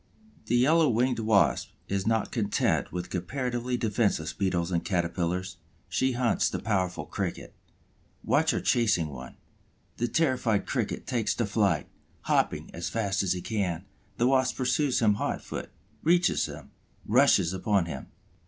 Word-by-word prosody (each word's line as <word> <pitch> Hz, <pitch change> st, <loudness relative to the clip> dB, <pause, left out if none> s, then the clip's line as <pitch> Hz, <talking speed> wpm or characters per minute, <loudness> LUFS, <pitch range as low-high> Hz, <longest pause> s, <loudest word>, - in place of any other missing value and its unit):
The 120 Hz, -, +2 dB
Yellow 155 Hz, +5 st, +4 dB
winged 125 Hz, +1 st, +1 dB
Wasp 110 Hz, -2 st, +2 dB
is 100 Hz, +1 st, -2 dB
not 115 Hz, -1 st, +1 dB
content 105 Hz, -4 st, 0 dB
with 90 Hz, -1 st, -5 dB
comparatively 125 Hz, +6 st, -2 dB
defenseless 105 Hz, -8 st, 0 dB
Beetles 90 Hz, -3 st, -1 dB
and 85 Hz, -2 st, 0 dB
Caterpillars; 90 Hz, 0 st, -1 dB, 0.3 s
she 130 Hz, 0 st, 0 dB
hunts 120 Hz, -1 st, +1 dB
the -, -, -3 dB
powerful 90 Hz, -7 st, -1 dB
Cricket. 90 Hz, +2 st, -4 dB, 0.7 s
Watch -, -, +2 dB
her -, -, +1 dB
chasing 100 Hz, -10 st, +2 dB
one. 65 Hz, -2 st, -9 dB, 0.6 s
The 120 Hz, -, 0 dB
terrified 125 Hz, -7 st, +1 dB
Cricket -, -, -2 dB
takes 115 Hz, -3 st, 0 dB
to 120 Hz, -, 0 dB
flight, 100 Hz, -6 st, +1 dB, 0.3 s
hopping -, -, 0 dB
as -, -, -4 dB
fast 100 Hz, -4 st, 0 dB
as 95 Hz, -2 st, +1 dB
he 90 Hz, -, -4 dB
can; 95 Hz, -5 st, -2 dB, 0.3 s
the 120 Hz, -, +2 dB
Wasp 130 Hz, 0 st, +2 dB
pursues 130 Hz, 0 st, +1 dB
him 105 Hz, -2 st, +5 dB
hot -, -, -1 dB
foot, -, -, -6 dB, 0.3 s
reaches 175 Hz, +2 st, +3 dB
him, -, -, -10 dB, 0.3 s
rushes 105 Hz, -7 st, +4 dB
upon 95 Hz, -1 st, +1 dB
him. 85 Hz, -, -6 dB
105 Hz, 145 wpm, -28 LUFS, 90-125 Hz, 0.7 s, him